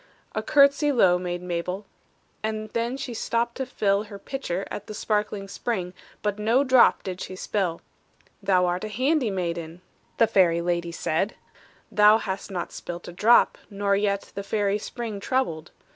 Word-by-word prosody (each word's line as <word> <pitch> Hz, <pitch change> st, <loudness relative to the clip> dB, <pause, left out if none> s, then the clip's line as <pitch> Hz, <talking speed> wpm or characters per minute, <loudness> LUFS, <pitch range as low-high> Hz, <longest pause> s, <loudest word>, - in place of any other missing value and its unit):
A -, -, -1 dB
courtesy 280 Hz, +1 st, +4 dB
low 185 Hz, -9 st, +4 dB
made 175 Hz, 0 st, -4 dB
Mabel, 180 Hz, +3 st, -3 dB, 0.6 s
And 215 Hz, 0 st, -3 dB
then 235 Hz, +3 st, -1 dB
she 255 Hz, -3 st, -5 dB
stooped 235 Hz, +1 st, -1 dB
to 265 Hz, -1 st, -3 dB
fill 205 Hz, -4 st, +1 dB
Her 205 Hz, -1 st, -9 dB
pitcher 195 Hz, -5 st, -4 dB
at 205 Hz, -, -6 dB
the 215 Hz, -, -7 dB
sparkling 210 Hz, -2 st, -1 dB
spring, 195 Hz, -3 st, -3 dB, 0.3 s
But 210 Hz, 0 st, -1 dB
no 230 Hz, +6 st, +3 dB
drop 255 Hz, -3 st, +5 dB
did 185 Hz, -1 st, -5 dB
she 185 Hz, -, -6 dB
spill. 185 Hz, -3 st, -2 dB, 0.6 s
"Thou 185 Hz, -2 st, +3 dB
art 180 Hz, +2 st, -1 dB
a -, -, -2 dB
handy 260 Hz, +3 st, +1 dB
maiden," 170 Hz, -3 st, -4 dB, 0.4 s
The 230 Hz, -, +6 dB
fairy 185 Hz, -6 st, +3 dB
lady 170 Hz, 0 st, -1 dB
said; 170 Hz, +5 st, -1 dB, 0.6 s
"Thou 210 Hz, +1 st, +6 dB
hast 195 Hz, -2 st, -4 dB
not 180 Hz, -3 st, -4 dB
spilt 175 Hz, 0 st, -7 dB
a -, -, -9 dB
drop, 225 Hz, +7 st, +4 dB
nor 200 Hz, -1 st, +1 dB
yet 200 Hz, 0 st, -1 dB
The 200 Hz, -, -4 dB
fairy 205 Hz, 0 st, 0 dB
spring 225 Hz, -2 st, -5 dB
troubled! 195 Hz, -8 st, -1 dB
200 Hz, 165 wpm, -25 LUFS, 180-230 Hz, 0.6 s, The